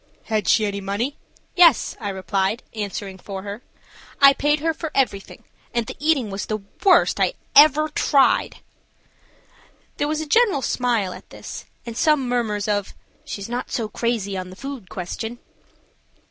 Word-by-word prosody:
"Had 215 -2 -1
she 215 - +4
any 200 -1 -3
money?" 205 +9 -2 0.4
"Yes," 340 -6 +5
I 205 - -3
replied, 195 +2 -1
answering 200 -3 -5
for 190 0 -7
her, 205 +3 -6 0.6
"I 275 -1 +8
paid 295 +2 +1
her 325 +2 0
for 320 0 -5
everything, 225 -8 -1 0.3
and 235 -1 +1
the 255 - -7
eating 285 -8 +1
was 195 0 -4
the 215 - -1 0.3
worst 380 -2 +5
I - - +2 0.2
ever 305 +1 +7
tried." 285 -2 +2 1.4
There 290 - 0
was 305 0 -1
a 315 - -3
general 380 - +3
smile 230 -7 0
at - - -13
this, - - -9 0.2
and 235 -1 -6
some 300 -1 +2
murmurs 220 -4 -1
of 205 -2 -1 0.3
"She's 200 -1 -6
not 245 +2 -4
so 225 -3 -2
crazy 215 -3 -2
on 185 -1 -5
the 185 - -11
food 270 -4 -8
question." 220 +6 -5
235 Hz, 160 wpm, -22 LUFS, 200-280 Hz, 1.4 s, I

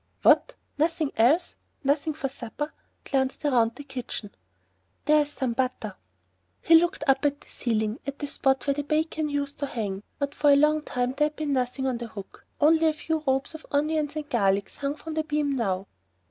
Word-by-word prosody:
"What? - - +5 0.2
nothing 320 -1 +1
else! 295 +11 +3 0.3
Nothing 285 +2 +1
for 275 - -2
supper!" 265 +3 -6 0.3
He - - -12
glanced 265 +1 0
round 235 -5 +3
the 290 - -8
kitchen. 250 -6 -6 0.7
"There's 300 0 +4
some 260 -4 -2
butter." 245 -5 -2 0.6
He 330 - +3
looked 340 0 +5
up 270 -1 +3
at 285 0 +1
the - - -18
ceiling, 220 -1 -1
at 280 0 -4
the 290 - -4
spot 270 -1 +1
where 280 - +2
the 290 - -2
bacon 310 +1 0
used 285 0 -2
to 285 - -1
hang, 200 -6 -3 0.2
but 280 0 -2
for 295 - +3
a 285 - +8
long 300 +2 +4
time 250 -3 -1
there 300 +1 +3
had 300 - -9
been 300 -2 -1
nothing 255 +1 -1
on 255 -3 0
the 235 - -5
hook; 200 -3 -11
only 320 +2 +5
a 315 - +3
few 315 +1 -2
ropes 265 +3 +1
of 315 - -10
onions 300 +1 0
and 305 -1 -4
garlic 200 -6 +1
hung 280 0 -3
from 320 +1 -7
the 315 0 0
beam 295 -2 0
now. 195 -6 -1
280 Hz, 200 wpm, -26 LUFS, 250-300 Hz, 0.7 s, a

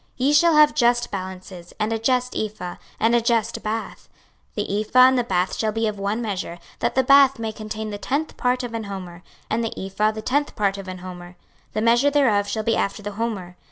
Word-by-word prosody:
26:045:010 255 - +1
Ye 290 - +3
shall 330 +2 +5
have 300 -1 +6
just 240 -4 +2
balances, 185 -2 -7
and 215 +1 0
a 225 - -1
just 250 +2 0
ephah, 210 -5 -4 0.2
and 225 +2 +3
a 240 - +4
just 230 -1 0
bath. 220 +1 -5 0.5
26:045:011 205 - -1
The 205 +2 0
ephah 220 +4 +1
and 255 0 +7
the - - +1
bath 185 -4 0
shall 220 -1 0
be 225 +1 -1
of 210 -2 -2
one 205 +4 -1
measure, 190 -5 -4 0.2
that - - -1
the 260 - +3
bath 275 0 +6
may 225 -1 -3
contain 215 0 -6
the 205 - -6
tenth 285 +8 -2
part 250 0 0
of 240 -2 -5
an 225 -1 -4
homer, 185 -3 -7 0.3
and 225 +2 -1
the 225 - -4
ephah 195 +3 0
the 215 0 -5
tenth 285 +5 0
part 200 -1 0
of 195 - -8
an 185 0 -6
homer: 180 -1 -9 0.4
the 215 - -1
measure 240 +5 +4
thereof 235 -9 +2
shall 220 +1 -2
be 230 +1 +1
after 205 +1 -2
the 205 - -4
homer. 200 -5 -4
220 Hz, 230 wpm, -23 LUFS, 200-245 Hz, 0.5 s, and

